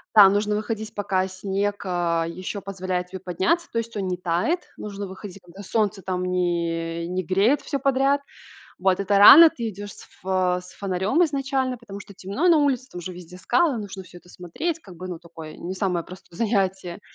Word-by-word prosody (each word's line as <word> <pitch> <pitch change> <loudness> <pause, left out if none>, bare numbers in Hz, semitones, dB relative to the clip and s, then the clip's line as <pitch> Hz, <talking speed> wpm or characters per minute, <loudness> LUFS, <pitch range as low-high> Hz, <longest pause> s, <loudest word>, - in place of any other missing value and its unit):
да, 200 -2 +10
нужно 210 +1 +1
выходить, 215 0 -4
пока 190 -2 0
снег, 200 +2 -2
а, 170 -2 0
ещё 185 +4 -5
позволяет 185 -2 -3
тебе 190 +1 -8
подняться. 190 - 0
То 230 - 0
есть 230 -1 -6
он 195 -2 -2
не 180 -1 -2
тает, 180 - 0 0.2
нужно 200 -1 -6
выходить, 190 +1 -9
когда 180 +3 -12
солнце 210 -1 0
там 180 -1 -2
не 170 -2 -1
не 185 +1 -2
греет 200 - +2
всё 280 - -3
подряд. 275 +1 +2 0.6
Вот, 185 0 +2
это 200 +1 +1
рано, 310 +11 +11
ты 235 -7 -5
идёшь 205 0 -8
с - - -14
ф - - -20
э, 185 -1 +1
с 180 - -14
фонарём 200 - +1
изначально, 270 -4 -1
потому 200 -4 -10
что 200 0 -12
темно 200 - -1
на 335 - +6
улице, 270 -4 +1
там - - -8
уже 180 +1 -6
везде 180 0 -11
скалы, 295 - +2
нужно 195 -2 -7
всё 180 -1 -14
это 180 - -22
смотреть. 180 - -4
Как 185 - -13
бы, 185 - -7
ну, 175 -2 -5
такое, 165 -2 -11
не 185 +2 -5
самое 180 -4 -1
простое 185 -2 -13
занятие. 190 -5 -1
195 Hz, 200 wpm, -24 LUFS, 180-220 Hz, 0.6 s, рано